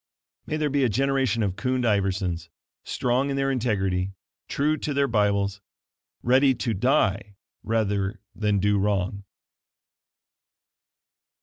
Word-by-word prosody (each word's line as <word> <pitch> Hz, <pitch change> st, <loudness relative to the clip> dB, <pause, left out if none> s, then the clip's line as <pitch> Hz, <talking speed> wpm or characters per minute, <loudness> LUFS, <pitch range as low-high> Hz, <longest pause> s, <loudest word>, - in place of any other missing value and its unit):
May 155 Hz, -, -1 dB
there 150 Hz, -2 st, 0 dB
be 140 Hz, -1 st, +2 dB
a 125 Hz, -, +3 dB
generation 130 Hz, -1 st, +1 dB
of 95 Hz, -3 st, -1 dB
Kund 125 Hz, +5 st, -1 dB
Iversons, 95 Hz, -6 st, 0 dB, 0.3 s
strong 125 Hz, +3 st, 0 dB
in 140 Hz, -, -1 dB
their 135 Hz, 0 st, +1 dB
integrity, 95 Hz, -7 st, 0 dB, 0.3 s
true 150 Hz, +2 st, +1 dB
to 150 Hz, -2 st, -3 dB
their 140 Hz, 0 st, +3 dB
Bibles 100 Hz, -3 st, +1 dB, 0.6 s
ready 130 Hz, +2 st, +4 dB
to 115 Hz, -1 st, -1 dB
die 105 Hz, -3 st, +1 dB, 0.3 s
rather 100 Hz, -3 st, -1 dB
than 105 Hz, -1 st, 0 dB
do 100 Hz, +1 st, +2 dB
wrong. 100 Hz, 0 st, -1 dB
105 Hz, 120 wpm, -25 LUFS, 100-130 Hz, 0.6 s, ready